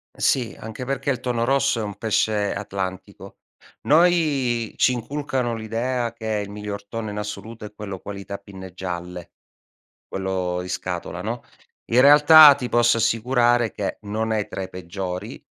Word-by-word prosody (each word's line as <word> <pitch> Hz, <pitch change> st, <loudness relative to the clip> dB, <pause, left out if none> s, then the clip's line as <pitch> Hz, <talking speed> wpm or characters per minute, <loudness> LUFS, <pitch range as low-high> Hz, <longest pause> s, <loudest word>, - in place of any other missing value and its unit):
Sì, 125 Hz, -4 st, 0 dB
anche 110 Hz, +3 st, -7 dB
perché 135 Hz, +1 st, -1 dB
il 130 Hz, -, -2 dB
tonno 120 Hz, -2 st, -1 dB
rosso 135 Hz, -2 st, +2 dB
è -, -, -2 dB
un 105 Hz, -2 st, -6 dB
pesce 105 Hz, -1 st, 0 dB
atlantico. 95 Hz, 0 st, -6 dB, 0.4 s
Noi 145 Hz, -8 st, +2 dB
ci 130 Hz, -, +4 dB
inculcano 130 Hz, 0 st, -2 dB
l'idea 115 Hz, +2 st, -2 dB
che 110 Hz, -2 st, -3 dB
il 100 Hz, -, -9 dB
miglior 105 Hz, 0 st, -6 dB
tonno 115 Hz, 0 st, -5 dB
in 105 Hz, -, -6 dB
assoluto 105 Hz, +2 st, -6 dB
è 105 Hz, -, -10 dB
quello 100 Hz, -3 st, -7 dB
qualità 100 Hz, 0 st, -7 dB
pinne 95 Hz, -2 st, -11 dB
gialle, 90 Hz, -1 st, -6 dB, 0.8 s
quello 95 Hz, -2 st, -2 dB
in 90 Hz, -, -7 dB
scatola, 90 Hz, -, -4 dB
no, -, -, -4 dB, 0.5 s
in 120 Hz, -, +6 dB
realtà 150 Hz, +1 st, +9 dB
ti 130 Hz, -3 st, -5 dB
posso 120 Hz, 0 st, +3 dB
assicurare 120 Hz, +1 st, +2 dB
che 100 Hz, -, -4 dB
non 110 Hz, +2 st, -2 dB
è 105 Hz, -2 st, 0 dB
tra 95 Hz, -, -5 dB
i 95 Hz, -, -5 dB
peggiori, 95 Hz, +4 st, -6 dB
110 Hz, 155 wpm, -23 LUFS, 100-125 Hz, 0.8 s, realtà